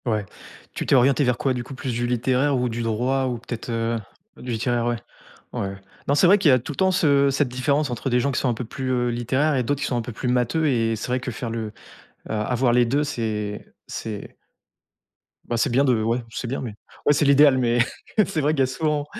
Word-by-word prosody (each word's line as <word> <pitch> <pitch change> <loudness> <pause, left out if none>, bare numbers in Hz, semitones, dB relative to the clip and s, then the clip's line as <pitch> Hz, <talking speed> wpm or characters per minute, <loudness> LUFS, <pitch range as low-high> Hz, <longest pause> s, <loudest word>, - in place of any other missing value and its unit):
Ouais, 110 -3 0 0.5
tu - - -4
t'es - - +4
orientée 135 +3 +4
vers 125 -2 +1
quoi, 135 0 0
du 125 -1 -3
coup? 135 +2 -9
Plus 130 -2 -4
du 120 +1 -1
littéraire 130 +3 +1
ou 125 0 0
du 115 +1 -3
droit 125 +4 0
ou 125 -2 -2
peut-être, 120 0 -7
heu 115 0 0 0.4
du 125 - -6
littéraire 120 +1 0
ouais, 120 - +1 0.6
ouais. 100 0 -3 0.3
Non 140 - +2
c'est 150 - +5
vrai 195 +4 +7
qu'il 190 -7 +4
y - - +6
a 130 - +5
tout 125 - -6
le - - -10
temps 190 0 +3
ce 140 -6 +3
cette 135 0 +1
différence 140 +4 0
entre 125 +3 -3
des 125 - +3
gens 140 +3 0
qui - - 0
sont 130 - +1
un - - 0
peu 120 - -5
plus 125 0 -1
littéraires 130 +6 +1
et 130 - +1
d'autres 140 +4 -1
qui - - -1
sont 125 - -1
un 120 - 0
peu 115 - -7
plus 120 +3 -4
matheux 125 +6 +1
et 115 -4 +1
c'est 105 - -5
vrai 125 +1 -1
que 125 - -4
faire 120 +1 -5
le, 115 -1 -3
heu, - - -12 0.6
a 110 - -1
avoir 125 +2 +1
les 120 0 +4
2 145 +5 +1
c'est 110 -6 -4
c'est 105 -3 -6 1.1
bah, 120 - -2
c'est 115 - +2
bien 130 +4 +3
de 125 -5 +2
ouais 115 +2 0
c'est 120 +2 -5
bien 130 - -3
mais 115 -5 -6 0.3
ouais 145 - +5
c'est 150 - +2
l'idéal 140 -1 +6
mais 120 -1 +2 0.5
c'est 160 -5 -1
vrai 150 +2 +2
qu'il 150 - -3
y - - +5
a - - +1
souvent, 150 +2 -1
125 Hz, 255 wpm, -23 LUFS, 115-140 Hz, 1.1 s, vrai